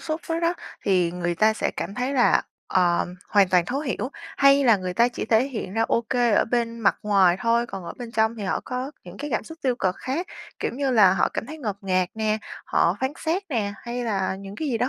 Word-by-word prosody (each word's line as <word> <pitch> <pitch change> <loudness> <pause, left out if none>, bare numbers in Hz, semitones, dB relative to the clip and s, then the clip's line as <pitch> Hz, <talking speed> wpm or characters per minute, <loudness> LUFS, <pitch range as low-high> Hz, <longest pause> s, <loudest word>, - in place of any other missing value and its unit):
xúc 315 0 -3
đó 330 0 -1
đó 340 +1 +1 0.3
thì 180 -4 +2
người 175 -1 -2
ta 215 +5 +4
sẽ 220 - -1
cảm 200 - -4
thấy 250 +4 -2
là, 245 -3 +4 0.2
ờ, 175 -2 +2 0.2
hoàn 200 -3 +4
toàn 180 -2 +3
thấu 265 +9 -2
hiểu, 265 -2 -3 0.3
hay 275 0 +5
là 230 -4 +6
người 185 -2 -4
ta 235 +5 +4
chỉ 245 - -5
thể 225 +2 +3
hiện 220 -7 -5
ra 225 - +1
ô 230 +1 +1
kê 245 -2 +3
ở - - +4
bên 230 0 -1
mặt 210 - +3
ngoài 195 -4 +4
thôi, 235 0 +2
còn 195 -5 -7
ở 170 - -6
bên 235 -1 -7
trong 220 +1 +2
thì 215 - -6
họ 190 - -1
có 255 +2 -4
những 180 +1 -11
cái 295 +1 -5
cảm 220 - -1
xúc 320 +7 -11
tiêu 255 -3 +1
cực 185 -5 0
khác, 290 +8 -3 0.3
kiểu - - -1
như 275 0 0
là 210 -7 +6
họ 190 - +2
cảm - - -5
thấy 310 +4 -8
ngột 210 -9 -3
ngạt 185 -2 +1
nè, 215 -1 0 0.3
họ 170 +3 +2
phán 265 +2 0
xét 340 +5 0
nè, 210 -7 -1
hay 240 +1 -4
là 190 -4 -1
những 195 0 -9
cái 310 - -3
gì 235 -4 0
đó 250 +2 +1
225 Hz, 255 wpm, -24 LUFS, 195-255 Hz, 0.3 s, là